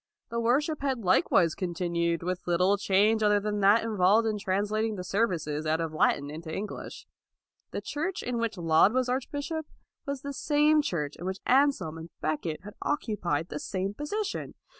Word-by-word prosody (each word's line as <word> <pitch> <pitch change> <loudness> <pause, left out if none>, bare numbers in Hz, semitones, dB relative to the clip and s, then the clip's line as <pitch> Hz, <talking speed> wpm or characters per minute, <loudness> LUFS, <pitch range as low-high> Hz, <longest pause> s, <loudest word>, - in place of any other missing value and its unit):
The 235 0 -2
worship 280 +7 +1
had 265 -5 -1
likewise 175 -2 +3
continued, 170 -2 -1
with 180 +1 -3
little 180 +3 +3
change 205 +2 +3
other 210 -1 +4
than 210 0 -2
that 205 +3 +5
involved 215 0 +3
in 215 -1 -1
translating 210 +3 0
the 180 - -5
serv 210 +5 +1
ices 155 -3 -3
out 160 +1 +1
of 165 -1 -3
Latin 145 -2 +1
into 160 +1 -7
English. 205 +4 -6 0.6
The - - -4
church 335 +6 -3
in 245 -1 -2
which 230 -3 -2
Laud 165 +4 +4
was 255 -1 +1
archbishop 285 +5 -3 0.4
was 280 -1 -4
the 280 0 -4
same 300 +2 +3
church 150 - -3
in 175 - -8
which 190 +1 -2
Anselm 260 - +2
and 165 +1 -9
Becket 155 +1 -2
had 205 +1 -9
occupied 185 - -1
the 150 - -4
same 195 +3 -3
position. 400 - -4
205 Hz, 175 wpm, -28 LUFS, 170-250 Hz, 0.6 s, that